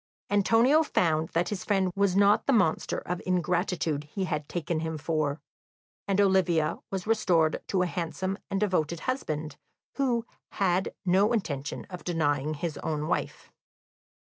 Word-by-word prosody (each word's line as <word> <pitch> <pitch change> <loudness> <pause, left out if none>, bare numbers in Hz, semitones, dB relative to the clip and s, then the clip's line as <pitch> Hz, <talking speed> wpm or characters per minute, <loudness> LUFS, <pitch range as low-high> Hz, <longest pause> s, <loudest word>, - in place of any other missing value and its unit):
Antonio 230 +9 +4
found 160 - +1
that 170 +1 +1
his 205 -3 -4
friend 195 -3 +1
was 200 -2 +2
not 200 +1 +4
the - - +4
monster 165 -9 +2
of 180 0 -4
ingratitude 175 -4 0
he 190 +6 -4
had 150 -4 -3
taken 170 -1 -2
him 160 0 -3
for; 155 -1 -1 0.7
and 195 0 +1
Olivia 185 -5 +2
was 190 -2 -4
restored 180 -8 +2
to 185 -2 +1
a - - +1
handsome 180 +3 -3
and 195 -1 -1
devoted 170 -5 0
husband, 155 - -3 0.4
who 245 -4 +1 0.3
had 190 -1 0
no 195 +5 +3
intention 145 - -3
of 180 - -7
denying 155 -3 0
his 165 0 -4
own 155 -1 -2
wife. - - -3
180 Hz, 145 wpm, -28 LUFS, 160-200 Hz, 0.7 s, Antonio